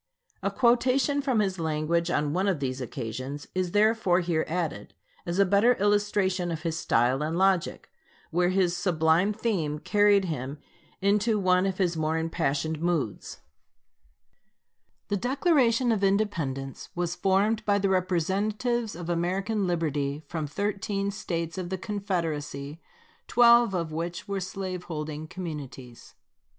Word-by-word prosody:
A - - 0
quotation 260 +3 +2
from 260 -6 +1
his 190 -3 -1
language 160 +2 0
on 150 -4 0
one 190 +3 +1
of 185 -6 +1
these 130 -1 -3
occasions 130 +3 -5
is 185 -1 -1
therefore 210 -2 +3
here 170 -2 0
added, 160 - -3 0.3
as 170 +1 -2
a 200 - +5
better 205 +6 +4
illustration 205 -3 +1
of 160 -1 -5
his 165 -2 -1
style 130 -4 +1
and 160 +2 -1
logic, 190 -2 +1 0.4
where 175 +2 +2
his 185 -2 +2
sublime 175 +1 +2
theme 200 -9 -1
carried 205 +3 +3
him 140 -4 -4 0.4
into 210 +3 +2
one 185 -1 +3
of 190 -1 -2
his 180 -3 +1
more 160 0 0
impassioned 160 -1 -1
moods: 165 - -2 1.7
The 205 - +1
Declaration 255 - +2
of 210 -3 0
Independence 165 -10 -1
was 175 -1 -1
formed 205 +4 +1
by 205 -1 +2
the 200 0 +1
representatives 200 +6 0
of 170 -1 -7
American 190 +4 -1
liberty 150 -4 -1
from 155 0 -4
thirteen 200 +3 -2
States 170 -4 -4
of 175 -1 -4
the 190 - -2
Confederacy, 165 -8 -3 0.5
twelve 235 -3 +5
of 165 -3 -2
which 170 +5 -4
were 200 -1 -2
slave 185 -1 -5
holding 155 -1 -5
communities. 145 -9 -8
180 Hz, 140 wpm, -27 LUFS, 160-205 Hz, 1.7 s, a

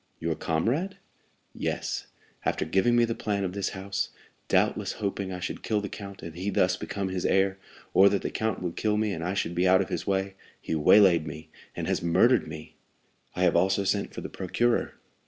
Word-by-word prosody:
"Your 85 0 -1
comrade?" 120 - -1 0.6
"Yes. - - -3 0.4
After - - 0
giving 95 +9 +2
me 120 0 +5
the 115 - -2
plan 105 -3 -2
of 90 -1 -2
this 100 -1 -1
house, 95 +1 -2 0.4
doubtless - - +1
hoping 100 -2 -3
I 90 - -5
should - - -4
kill 110 -2 0
the 100 -1 -4
count 100 -3 -9
and 85 -1 -7
he 95 +3 -3
thus 90 -2 +2
become 100 0 -4
his 95 -1 -3
heir, 95 0 +2 0.3
or 100 +1 +7
that 100 -1 -1
the - - -2
count 110 -4 -2
would 85 -2 -3
kill 105 -1 +1
me 105 -1 0
and 80 -2 -4
I 90 +3 -1
should 85 -3 -1
be 90 +2 +2
out 95 0 +6
of 95 - -1
his - - -3
way, 95 0 0 0.3
he - - -4
waylaid 85 +1 +5
me, 80 +1 -8 0.3
and - - -3
has - - 0
murdered 115 +9 +4
me." 80 0 -9 0.6
"I 90 - 0
have 90 - +4
also 95 +3 +3
sent 100 +1 0
for - - -7
the - - -6
procureur." 115 +6 0
95 Hz, 210 wpm, -27 LUFS, 90-100 Hz, 0.6 s, or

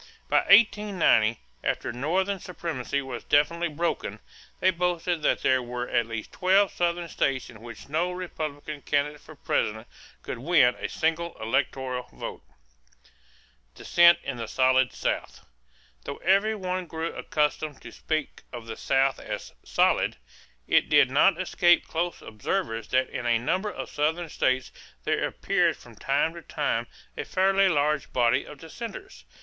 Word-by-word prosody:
By - - +2
1890, 195 - +4 0.2
after - - -2
Northern 185 +10 0
supremacy 150 -6 -4
was 125 -3 -6
definitely 170 +4 +2
broken, 165 +2 -2 0.4
they 185 - +4
boasted 175 -1 -1
that - - +1
there 130 0 +3
were 125 0 -4
at 115 - +1
least 115 -1 -6
twelve 190 +1 +3
Southern 175 0 -1
states 135 -6 -1
in 110 -2 -14
which 115 -2 -10
no 165 +5 0
Republican 155 -5 -5
candidate 145 +1 -1
for 155 - -13
President 110 -4 -1 0.4
could - - -5
win 135 -3 +4
a - - -3
single 165 +1 -1
electoral 125 +2 -1
vote. - - -7 1.3
=Dissent 170 0 +5
in 140 -2 -4
the 115 -1 -5
Solid 130 0 +3
South.= - - -3 0.6
Though - - -5
every 200 +4 +3
one 185 -2 -3
grew 165 +1 -4
accustomed 150 -1 -1
to - - -9
speak 155 -2 -3
of 120 -2 -8
the 115 -1 -7
South 135 0 +1
as - - -6
"solid," - - +2 0.5
it - - +3
did 145 -4 +5
not 165 +6 +4
escape 175 -1 +3
close 170 +2 -3
observers 115 - -3
that 130 0 +2
in 120 -2 -4
a 120 -1 +4
number 185 - -1
of - - -6
Southern 160 +3 -1
states 130 -2 0 0.3
there - - 0
appeared - - +1
from - - -15
time 145 +4 0
to 170 - -9
time - - -2 0.3
a - - -3
fairly 195 +1 +3
large 150 -2 +1
body 125 +2 +2
of 150 - -11
dissenters. 235 - -9
155 Hz, 150 wpm, -26 LUFS, 130-175 Hz, 1.3 s, =Dissent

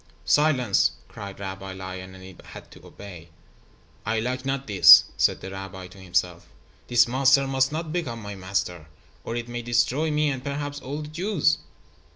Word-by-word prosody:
"Silence," 130 -9 +2
cried 100 -1 -10
Rabbi 95 -1 -6
Lion, 95 0 -8
and 95 - -13
it 95 -1 -13
had - - -13
to - - -16
obey. 90 -5 -12 0.7
"I 110 +1 -1
like 125 +3 -3
not 135 0 -2
this," 100 -5 +9
said - - +1
the 95 - -7
rabbi 95 -1 -8
to 95 +2 -15
himself. 90 -1 -2 0.4
"This 120 0 +4
monster 135 +2 +3
must 135 0 +1
not 160 0 -4
become 135 -10 -3
my 105 -2 -7
master, 95 -4 -4 0.4
or 115 - -5
it 120 0 -4
may 120 0 -5
destroy 120 +6 +1
me 150 -1 +1
and 130 -2 -5
perhaps 145 0 -4
all 145 +3 -6
the - - -8
Jews." 160 -1 0
120 Hz, 175 wpm, -24 LUFS, 95-140 Hz, 0.7 s, this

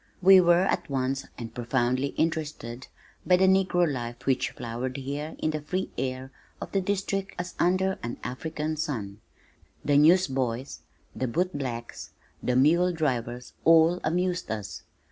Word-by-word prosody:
We 190 0 +8
were 175 0 +5
at 175 -3 -1
once 135 0 -1
and 115 -1 -7
profoundly 125 +2 0
interested 150 -7 -2 0.4
by 180 - +4
the 190 - +4
negro 185 -2 +3
life 120 -4 -5
which 135 -1 +1
flowered 120 +3 -5
here 140 +3 -5
in 155 - -1
the 155 -1 -3
free 185 +5 -3
air 130 0 -4 0.3
of - - -7
the 195 - +1
District 195 0 -2
as 175 0 -5
under 190 +2 +2
an 120 +1 -5
African 155 +4 -4
sun; 110 -9 -4 0.6
the 145 -1 +4
newsboys, 135 -7 +2 0.3
the 130 - -1
bootblacks, 130 -6 -3 0.3
the 125 - 0
muledrivers, 140 -5 +1
all 165 +2 +5
amused 180 +1 -1
us. 105 -2 -5
145 Hz, 140 wpm, -27 LUFS, 125-175 Hz, 0.6 s, We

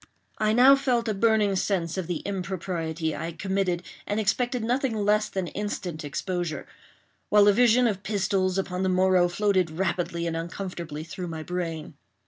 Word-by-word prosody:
I 215 0 +2
now 255 +5 +7
felt 250 -4 0
a 215 - +1
burning 210 -1 +2
sense 180 -3 -1
of 185 -3 -3
the 175 -3 -3
impropriety 170 -4 -3
I 160 - -4
had 165 0 -7
committed, 190 -2 -1 0.2
and 205 +1 -1
expected 245 +3 0
nothing 245 +1 0
less 210 0 +2
than 190 -2 -2
instant 185 -6 -4
exposure; 175 +2 -3 0.6
while 205 -1 +6
a 205 - +7
vision 245 +2 +4
of 205 -5 0
pistols 190 -2 0
upon 185 -1 -2
the 190 - +1
morrow 185 -1 +4
floated 185 -1 +1
rapidly 170 0 -2
and 165 -1 -2
uncomfortably 170 -2 -5
through 175 +2 -6
my 160 -2 -5
brain. 165 -3 -4
190 Hz, 165 wpm, -26 LUFS, 170-210 Hz, 0.6 s, now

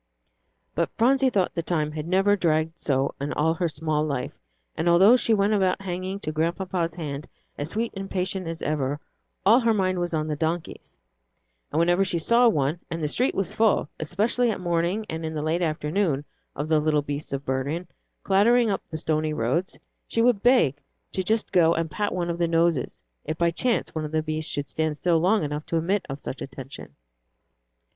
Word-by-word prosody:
But - - 0
Phronsie 265 +3 +4
thought 195 -7 0
the 170 - -1
time 155 -3 -1
had 155 +1 -5
never 195 +3 +3
dragged 160 -2 0
so 135 -1 +1
in 145 +1 -2
all 160 +2 +2
her 170 +1 -1
small 155 0 -1
life; 140 -5 -3 0.4
and, 170 - +1
although 190 +8 +7
she 240 - +1
went 205 0 +3
about 190 -3 +2
hanging 185 +1 -4
to 155 - -3
Grandpapa's 170 +1 -1
hand 150 -4 -5 0.3
as 145 +2 -4
sweet 225 +5 -2
and 195 0 -5
patient 185 -1 -2
as 165 0 -5
ever, 145 -1 -1 0.5
all 225 +5 +7
her 230 -3 +2
mind 185 -2 +1
was 175 -1 -1
on 155 -1 0
the 155 -1 -2
donkeys; 160 +2 -4 0.7
and - - -2
whenever 175 +3 +3
she 180 - 0
saw 235 +8 +4
one, 150 -3 0
and 165 -2 -4
the - - +1
street 250 - +1
was 195 -2 -1
full, 220 -9 +2
especially 210 +10 +1
at 215 - -2
morning 175 +4 0
and 160 0 -5
in 160 0 -4
the 150 - -2
late 160 +3 0
afternoon, 155 -1 0 0.3
of 145 +2 -3
the 155 -1 +3
little 150 -1 +1
beasts 145 +1 -5
of 140 0 -4
burden, 140 +7 -2 0.4
clattering 225 +4 +4
up 195 - -1
the 160 - -4
stony 155 0 0
roads, 150 +9 -1 0.3
she 230 - +1
would 240 -5 +3
beg 225 - +3 0.3
to 190 - -1
just 215 +4 0
go 170 -3 +4
and 165 -1 -2
pat 205 +6 -1
one 175 -1 -1
of 170 - -5
the 170 - +2
noses, 165 - +1 0.2
if 155 +1 -4
by 170 0 +2
chance 240 +7 0
one 155 - -3
of 150 - -6
the 155 0 0
beasts 155 0 -3
should 145 -1 -3
stand 155 -1 -2
still 170 +1 +2
long 190 +4 +2
enough 150 0 -3
to 165 - 0
admit 185 +5 0
of 135 +1 -5
such 130 - -6
attention. 135 - -9
165 Hz, 200 wpm, -25 LUFS, 155-195 Hz, 0.7 s, although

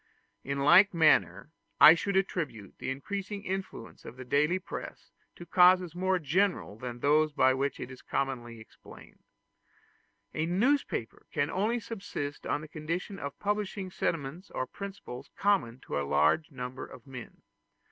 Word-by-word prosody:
] - - -47
In 140 - -1
like 175 +6 +6
manner 135 - +3 0.3
I 155 - +11
should 195 +3 -2
attribute 140 - -3
the - - -4
increasing 200 +9 -4
influence 190 - -6
of 120 - -10
the 130 - -8
daily 150 +7 +2
press 185 - -8 0.2
to 175 - -10
causes 180 -1 +5
more 185 +1 +1
general 175 - 0
than 120 +1 -7
those 150 +1 +3
by 130 -2 +4
which 135 +2 -2
it 130 - -6
is 130 - -11
commonly 120 -4 -3
explained. 110 - -15 1.1
A 155 +1 -1
newspaper 210 - 0
can 145 +2 0
only 220 +5 0
subsist 195 -10 -6
on - - 0
the 155 - -9
condition 170 +5 -4
of 140 -1 -6
publishing 205 -2 -2
sentiments 165 +2 -3
or 130 - -3
principles 195 -9 -8
common 160 - +1
to - - -3
a 70 - -4
large 75 - +3
number 130 -2 -6
of 125 - -13
men. 130 -3 -10
155 Hz, 155 wpm, -30 LUFS, 130-190 Hz, 1.1 s, I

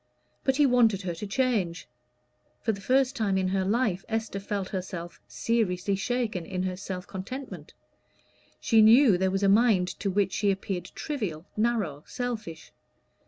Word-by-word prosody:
But 265 - +2
he 295 +1 +4
wanted 230 -6 +3
her 175 -2 -2
to 185 +5 -6
change. 200 -7 0 0.8
For - - +2
the 200 -2 -6
first 260 +4 +2
time 200 -4 0
in 185 -1 +1
her 190 0 0
life 200 -2 0
Esther 220 -3 -2
felt 195 -1 -3
herself 180 -3 -6
seriously 200 -4 0
shaken 220 -2 -2
in 185 +1 -3
her 185 -1 -2
self 185 -1 -6
contentment. 255 +9 -7 0.8
She 225 -1 +4
knew 225 0 +7
there 190 +1 +1
was 195 +1 -1
a - - +4
mind 200 -3 +4
to 200 - -1
which 195 0 +1
she 205 - +1
appeared 190 -2 -2
trivial, 200 - -4
narrow, 210 -10 0
selfish. 220 -10 -5
200 Hz, 160 wpm, -27 LUFS, 185-230 Hz, 0.8 s, knew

